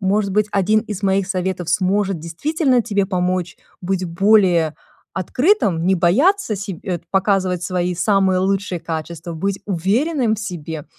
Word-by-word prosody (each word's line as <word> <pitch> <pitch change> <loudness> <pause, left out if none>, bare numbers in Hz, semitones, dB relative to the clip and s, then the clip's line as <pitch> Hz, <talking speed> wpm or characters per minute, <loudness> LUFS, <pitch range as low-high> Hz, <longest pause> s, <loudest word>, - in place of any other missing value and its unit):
может 195 +1 +1
быть, 210 +1 +2
1 210 +2 +2
из 210 -2 -7
моих 195 0 +2
советов 185 -2 -2
сможет 190 0 +1
действительно 255 - 0
тебе 205 -4 0
помочь 180 -2 -1 0.2
быть 185 0 -2
более 175 -3 +3 0.4
открытым, 195 - +1
не 190 - +4
бояться 235 - +2
себ 195 -3 -6
э, 180 -4 -2
показывать 190 -2 +1
свои 180 0 -1
самые 190 0 +2
лучшие 190 -2 -1
качества, 165 +1 -5
быть 195 +4 -2
уверенным 220 - +1
в - - -7
себе. 160 -6 -6
190 Hz, 140 wpm, -19 LUFS, 175-205 Hz, 0.4 s, не